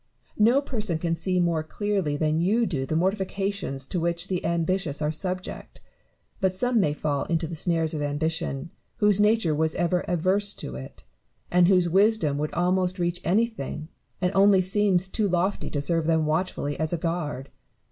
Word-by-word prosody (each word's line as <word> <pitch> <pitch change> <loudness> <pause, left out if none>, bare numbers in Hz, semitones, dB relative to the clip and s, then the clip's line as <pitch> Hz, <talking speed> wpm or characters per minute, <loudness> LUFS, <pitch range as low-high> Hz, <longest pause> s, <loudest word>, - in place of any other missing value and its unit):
No 235 +6 +5
person 215 - -2
can 165 0 -1
see 180 +2 0
more 170 -2 +1
clearly 185 -2 -2
than 155 +1 +1
you 215 +7 +2
do 135 -9 -2
the 155 - -1
mortifications 190 -5 -1
to 175 - -3
which 170 +2 -1
the 180 -2 -2
ambitious 170 -2 -1
are 150 0 0
subject; 185 +3 -5 0.6
but 190 -1 +1
some 245 +4 +2
may 170 -7 +2
fall 145 -1 -2
into 165 -1 -1
the 165 - -5
snares 165 -1 0
of 155 - -3
ambition 145 0 -2 0.3
whose 210 -1 +3
nature 210 -6 +3
was 160 +1 0
ever 175 +1 +1
averse 185 +4 +1
to 65 - -7
it, 65 0 -10 0.5
and 180 0 +5
whose 180 -2 +4
wisdom 190 -5 +2
would 150 0 -2
almost 180 +1 +1
reach 175 0 -1
anything, 180 - -1 0.3
and 180 -1 +1
only 195 0 +5
seems 190 0 +2
too 205 +1 -1
lofty 180 +3 0
to 145 - -2
serve 165 +2 0
them 160 -1 +2
watchfully 155 -2 -1
as 155 0 0
a 175 - 0
guard. 160 -5 -3
175 Hz, 175 wpm, -25 LUFS, 155-195 Hz, 0.6 s, No